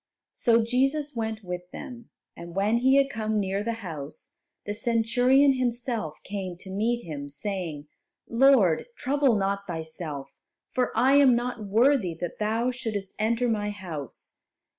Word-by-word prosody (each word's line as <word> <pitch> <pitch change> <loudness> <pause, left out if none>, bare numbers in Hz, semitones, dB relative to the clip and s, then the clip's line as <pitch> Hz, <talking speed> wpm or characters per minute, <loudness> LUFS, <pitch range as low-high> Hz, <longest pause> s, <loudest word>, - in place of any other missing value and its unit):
So 230 -2 +3
Jesus 270 +5 0
went 220 -1 -3
with 180 -1 -6
them, 245 -5 -9 0.3
and 170 0 -10
when 205 +4 +2
He 265 +2 +4
had 275 0 +5
come 220 -4 -1
near 195 0 -1
the 230 +1 -1
house, 150 -4 -7 0.3
the 205 - -2
Centurion 245 +5 +3
himself 240 - -2
came 190 -3 -5
to 190 +1 -10
meet 230 +5 0
Him, 145 -3 -6
saying, 160 -1 -4 0.4
"Lord, 235 - +4
trouble 275 -2 +2
not 200 0 -1
Thyself, 160 -4 -6 0.4
for 250 -1 0
I 270 +3 +5
am 270 -4 +6
not 240 -3 -3
worthy 225 - +3
that 175 - -5
Thou 225 +4 +1
shouldest 220 -6 -4
enter 230 +3 +1
my 210 -3 0
house. 170 - -7
220 Hz, 145 wpm, -27 LUFS, 185-245 Hz, 0.4 s, am